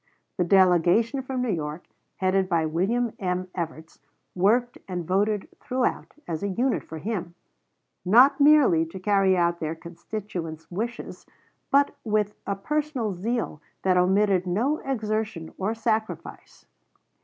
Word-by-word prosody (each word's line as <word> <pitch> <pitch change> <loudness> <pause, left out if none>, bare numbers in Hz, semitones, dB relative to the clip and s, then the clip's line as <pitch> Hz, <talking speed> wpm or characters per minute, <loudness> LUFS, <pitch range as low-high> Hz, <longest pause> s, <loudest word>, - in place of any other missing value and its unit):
The - - +4
delegation 190 - +4
from 260 -1 -3
New 245 - 0
York, 155 -1 -4 0.3
headed 190 0 +1
by 165 -3 +2
William 215 +9 0
M. 185 -1 -2
Evarts, 160 -2 -6 0.3
worked 235 +7 +2
and 180 -3 -4
voted 205 +3 0
throughout 255 0 -2
as 160 -2 -3
a 200 - -1
unit 240 +6 0
for 160 - -8
him, 175 -1 -4 0.7
not 250 - +6
merely 280 - +6
to 185 +4 -9
carry 195 -1 +3
out 170 0 +1
their 160 +1 -3
constituents' 170 -2 -7
wishes, 225 +6 -5 0.4
but 280 +1 +3
with, 210 -2 0
a 200 - 0
personal 275 -1 -2
zeal 215 -3 -3 0.2
that 185 -1 +3
omitted 190 +1 +3
no 245 - 0
exertion 215 -9 -3
or 205 +4 -1
sacrifice. 220 -1 -3
195 Hz, 130 wpm, -25 LUFS, 175-230 Hz, 0.7 s, not